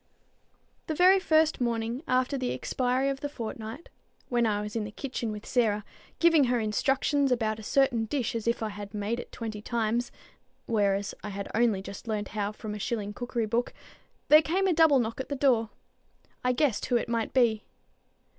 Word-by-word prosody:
The 315 - -2
very 370 +4 +6
first 315 -5 +2
morning 235 +1 -1
after 255 +2 +1
the 255 -2 -1
expiry 255 +1 0
of 275 -1 -1
the 290 0 -4
fortnight, 230 +2 -7 0.4
when 240 -2 +2
I 205 -1 0
was 210 +1 -7
in 225 - 0
the 210 - -5
kitchen 240 -2 -4
with 210 0 -7
Sarah, 215 -4 +1 0.3
giving 330 -4 +5
her 245 -1 +1
instructions 270 +5 +1
about 220 -3 0
a - - -8
certain 240 0 +2
dish 255 +1 -2
as 230 -1 -4
if 235 -1 +1
I 220 - -1
had 205 0 -8
made 210 +3 -2
it - - -8
twenty 220 -2 -6
times, 235 +1 -1 0.5
whereas 205 -3 +1
I 210 - -4
had 200 0 -5
only 220 -4 +2
just 200 +4 -9
learned 210 -2 -2
how 205 -1 -2
from 215 0 -7
a 210 - -6
shilling 210 -2 -3
cookery 240 0 -2
book, 230 +3 -1 0.5
there 305 +1 +8
came 370 +5 0
a 375 - +3
double 320 -3 +5
knock 230 0 -1
at - - -9
the 285 - -2
door. 250 -5 +2 0.7
I 250 - +3
guessed 255 -3 +1
who 245 - +3
it - - -2
must 230 -1 -1
be. 230 -4 +3
235 Hz, 195 wpm, -28 LUFS, 215-265 Hz, 0.7 s, there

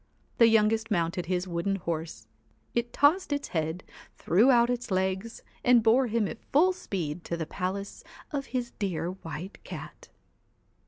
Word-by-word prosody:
The 230 - +8
youngest 220 0 +3
mounted 170 -3 0
his 180 0 -1
wooden 175 +3 -1
horse, 165 -3 -4 0.5
it 235 0 -1
tossed 310 +4 +3
its 285 0 -2
head, 160 +1 -2 0.3
threw 210 +10 +3
out 240 -2 +5
its 245 0 -3
legs, 190 +3 -1 0.2
and 245 -2 +5
bore 240 +4 +4
him 225 -2 +1
at 230 - -8
full 355 +7 +5
speed 175 - -4
to 170 - -3
the 160 - -3
palace 195 +4 -4 0.3
of 275 -2 -3
his 245 -2 -3
dear 180 -3 -1
White 175 0 -8
Cat. - - -9
200 Hz, 155 wpm, -28 LUFS, 175-240 Hz, 0.5 s, The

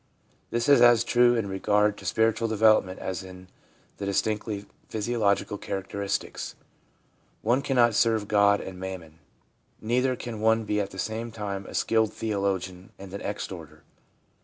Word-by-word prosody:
This 120 0 -1
is 140 -4 +6
as 120 -1 +6
true 120 0 +4
in 115 -4 -1
regard 105 +2 +1
to - - -12
spiritual 115 +1 +1
development 110 -4 +3
as 95 -3 -4
in 90 -1 -12 0.5
the 100 - -4
distinctly 105 0 -1 0.2
physiological 105 -2 0
character 95 +1 -5
istics. 100 -1 -3 0.9
One 120 +5 +2
cannot 120 -4 +3
serve 110 -2 +2
God 100 -1 +4
and 95 -1 -8
mammon. 90 -4 -7 0.6
Neither 125 +3 +1
can 115 -3 -7
one 110 0 +3
be 105 -1 0
at 100 - -4
the 95 - -12
same 110 +4 -3
time 100 -3 -5
a - - -9
skilled 110 -2 +1
theologian 95 -4 -2
and 95 -1 -11
an 100 - -5
exhorter. 85 -7 -6
105 Hz, 150 wpm, -26 LUFS, 95-115 Hz, 0.9 s, is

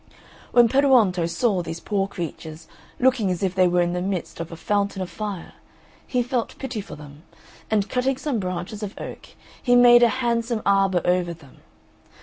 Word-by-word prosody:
When 240 -1 +6
Peruonto 230 -10 +3
saw 200 0 0
these 165 0 -6
poor 195 0 -1
creatures, 160 -3 -7 0.3
looking 250 -6 +2
as 180 +1 -2
if 185 -2 0
they 185 -1 +4
were 175 0 +2
in 175 0 -1
the 180 - -2
midst 185 -2 -4
of 165 0 -6
a - - -6
fountain 200 +2 -1
of 185 -2 -4
fire, 200 -2 -6 0.5
he 250 -2 0
felt 245 -1 -3
pity 255 -5 -5
for - - -10
them, 145 0 -13 0.5
and 210 -2 +1
cutting 255 +2 0
some 270 -4 -2
branches 185 +2 -5
of 205 -1 -6
oak, - - -8 0.3
he 245 -1 +3
made 240 0 +7
a 240 - +6 0.2
handsome 230 -1 -1
arbour 195 -3 +2
over 175 -1 +1
them. 140 -5 -18
200 Hz, 180 wpm, -23 LUFS, 175-240 Hz, 0.5 s, made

